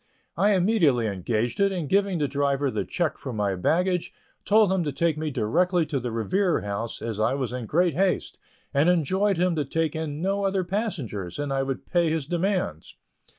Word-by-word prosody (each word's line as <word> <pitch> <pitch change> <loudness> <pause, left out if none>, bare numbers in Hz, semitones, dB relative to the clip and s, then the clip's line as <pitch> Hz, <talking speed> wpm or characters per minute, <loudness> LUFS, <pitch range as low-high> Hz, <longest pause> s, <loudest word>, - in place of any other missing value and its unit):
I 205 +1 +3
immediately 175 - +3
engaged 110 - -2
it, 200 0 +3
and 175 -6 -3
giving 195 +1 +2
the 150 -2 0
driver 140 0 0
the - - -1
check 170 -4 -2
for 130 - -5
my 105 -3 0
baggage, 180 - 0 0.3
told 210 -2 +4
him 185 -2 +1
to 150 - -2
take 170 +1 +1
me 155 0 -3
directly 165 - +1
to 145 -3 -2
the 120 -1 -4
Revere 175 - +1
House, 105 +3 -4
as 115 -2 -4
I 115 +5 +2
was 130 -3 -3
in 125 -3 -4
great 175 +4 +2
haste, 185 +4 0 0.3
and 145 +5 +3
enjoined 185 +4 +2
him 180 0 +2
to 150 - +1
take 160 +3 -1
in 155 -2 -4
no 195 +3 0
other 195 -1 +1
passengers, 170 - -3
and 145 -1 -2
I 135 - +1
would 135 -1 -3
pay 175 -2 +1
his 155 -3 -1
demands. 175 - -2
160 Hz, 195 wpm, -25 LUFS, 125-185 Hz, 0.3 s, told